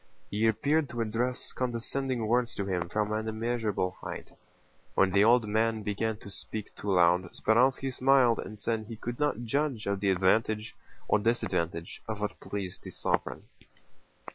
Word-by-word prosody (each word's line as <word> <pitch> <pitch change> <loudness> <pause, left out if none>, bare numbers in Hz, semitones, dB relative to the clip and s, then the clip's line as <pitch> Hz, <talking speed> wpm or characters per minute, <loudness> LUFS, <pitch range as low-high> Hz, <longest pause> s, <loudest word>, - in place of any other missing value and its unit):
He 110 +2 +2
appeared 145 +6 +2
to 120 - -3
address 120 +3 -1
condescending 125 0 -1
words 120 +1 +1
to 100 - -2
him 90 -3 -2
from 105 +1 0
an 110 +1 -1
immeasurable 110 -4 -1
height. - - -7 0.6
When 95 -1 +4
the 100 +2 +5
old 115 0 +5
man 110 +1 +1
began 105 +2 -1
to 100 - -10
speak 105 +3 -7
too 100 -1 -2
loud, 90 +1 +4
Speránski 130 +4 +2
smiled 130 -2 +4
and 110 - -6
said 110 +1 -1
he 115 - -6
could 120 +2 -6
not 145 -6 0
judge 135 -1 -1
of 100 -1 0
the 100 0 +1
advantage 105 +4 +2 0.3
or 110 - +3
disadvantage 90 -7 -1
of 110 -2 -3
what 105 0 -3
pleased 100 -3 -5
the - - -9
sovereign. - - -1
110 Hz, 165 wpm, -29 LUFS, 100-120 Hz, 0.6 s, the